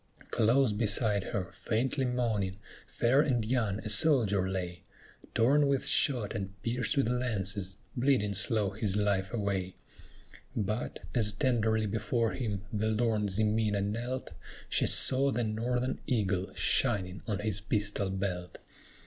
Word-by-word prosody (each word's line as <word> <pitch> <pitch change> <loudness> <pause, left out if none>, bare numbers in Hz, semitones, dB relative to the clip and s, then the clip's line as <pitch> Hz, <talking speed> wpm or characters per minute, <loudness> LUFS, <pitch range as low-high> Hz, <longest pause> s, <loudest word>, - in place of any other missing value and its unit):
Close 120 +1 +3
beside 105 -1 +2
her, 95 -5 -3
faintly 130 +4 -1
moaning, 110 -6 -1 0.3
fair 130 +4 +3
and 125 -7 +1
young, 110 -4 0
a - - -2
soldier 105 -6 +4
lay, 90 -2 -4 0.5
Torn 140 +5 +4
with 140 -1 +1
shot 120 -8 +2
and 95 -3 -5
pierced 120 +2 -1
with 135 - +3
lances, 100 -6 -2 0.2
bleeding 125 -6 +2
slow 105 0 0
his 100 -1 -2
life 100 -2 0
away; 100 -5 -2 0.8
But, 105 +3 -2
as 110 -4 +1
tenderly 110 -1 +1
before 115 +2 0
him 105 -6 -3
the 110 +1 0
lorn 110 -1 +1
Ximena 105 +1 +1
knelt, 120 +6 -3 0.4
She - - +3
saw 135 +1 +2
the 120 - 0
Northern 120 +4 -1
eagle 100 -6 0
shining 95 0 +1
on 105 -3 -1
his 105 -1 -2
pistol 100 -2 -1
belt. 95 -2 -3
110 Hz, 130 wpm, -30 LUFS, 100-120 Hz, 0.8 s, soldier